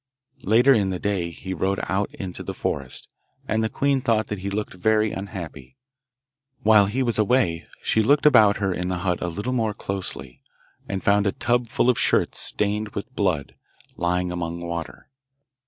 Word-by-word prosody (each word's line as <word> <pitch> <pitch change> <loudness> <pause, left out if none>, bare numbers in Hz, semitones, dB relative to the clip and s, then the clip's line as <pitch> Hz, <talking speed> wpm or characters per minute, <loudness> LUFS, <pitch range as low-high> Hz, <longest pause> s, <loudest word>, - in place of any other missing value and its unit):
Later 120 +7 +5
in 100 -5 +2
the 95 - -2
day 95 -3 -1
he 95 +3 -7
rode 95 +3 -1
out 100 +2 -1
into 95 -2 -6
the - - -6
forest, 70 -3 -3 0.4
and 110 0 0
the 110 - 0
queen 140 +3 +1
thought 110 -3 +1
that 105 - -3
he 100 +2 -4
looked 105 +1 -3
very 110 +3 +2
unhappy. 85 -10 -7 0.9
While 105 -2 +6
he 125 +6 -1
was 120 -3 0
away 105 -7 +1 0.2
she 110 - +2
looked 145 +7 +3
about 105 -8 +6
her 95 -3 0
in 90 0 -3
the 90 -1 -1
hut 90 -2 0
a - - -1
little 100 +9 -3
more 110 -4 0
closely, 70 - -6 0.5
and 95 -1 -3
found 100 0 +3
a - - +2
tub 120 +4 0
full 120 - 0
of 125 - +3
shirts - - +2
stained 105 +1 +1
with 130 +6 -6
blood, 90 -9 0 0.4
lying 90 +1 0
among 85 -1 -4
water. 85 +8 -6
100 Hz, 180 wpm, -24 LUFS, 90-110 Hz, 0.9 s, While